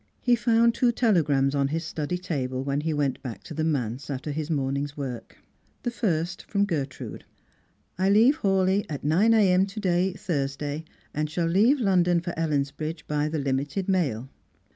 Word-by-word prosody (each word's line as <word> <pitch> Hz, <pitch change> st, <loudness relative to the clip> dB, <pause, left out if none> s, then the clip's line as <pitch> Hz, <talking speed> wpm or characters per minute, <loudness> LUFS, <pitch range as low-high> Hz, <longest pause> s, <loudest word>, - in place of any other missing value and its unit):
He 245 Hz, -1 st, +3 dB
found 235 Hz, 0 st, +3 dB
two 240 Hz, +1 st, +2 dB
telegrams 150 Hz, -, +2 dB
on 140 Hz, -1 st, +1 dB
his 160 Hz, +4 st, -2 dB
study 155 Hz, +2 st, -3 dB
table 135 Hz, -8 st, -3 dB
when 140 Hz, +1 st, -1 dB
he 160 Hz, +1 st, -1 dB
went 145 Hz, -3 st, -1 dB
back 125 Hz, -5 st, -7 dB
to -, -, -8 dB
the 160 Hz, -, -2 dB
manse 130 Hz, -4 st, -2 dB
after 140 Hz, +2 st, -4 dB
his 155 Hz, +1 st, -3 dB
morning's 140 Hz, -1 st, -1 dB
work. 130 Hz, -4 st, -6 dB, 0.5 s
The 240 Hz, -, -1 dB
first 180 Hz, -6 st, -1 dB
from 200 Hz, -1 st, +2 dB
Gertrude, 145 Hz, -8 st, -4 dB, 0.4 s
" -, -, -36 dB
I 190 Hz, +1 st, +3 dB
leave 230 Hz, +9 st, +5 dB
Hawleigh 195 Hz, -1 st, +1 dB
at 145 Hz, -3 st, -5 dB
9 175 Hz, +10 st, +3 dB
a.m. 190 Hz, -3 st, +4 dB
to 200 Hz, +2 st, -7 dB
day, 185 Hz, -1 st, +1 dB
Thursday, 145 Hz, -3 st, -3 dB, 0.3 s
and 150 Hz, +1 st, -1 dB
shall 170 Hz, +2 st, -1 dB
leave 215 Hz, -, +4 dB
London 180 Hz, -5 st, +3 dB
for 170 Hz, 0 st, -5 dB
Ellensbridge 155 Hz, 0 st, -2 dB
by 150 Hz, 0 st, 0 dB
the 160 Hz, -, -2 dB
limited 140 Hz, +6 st, -1 dB
mail." 140 Hz, -, 0 dB
160 Hz, 175 wpm, -26 LUFS, 140-190 Hz, 0.5 s, leave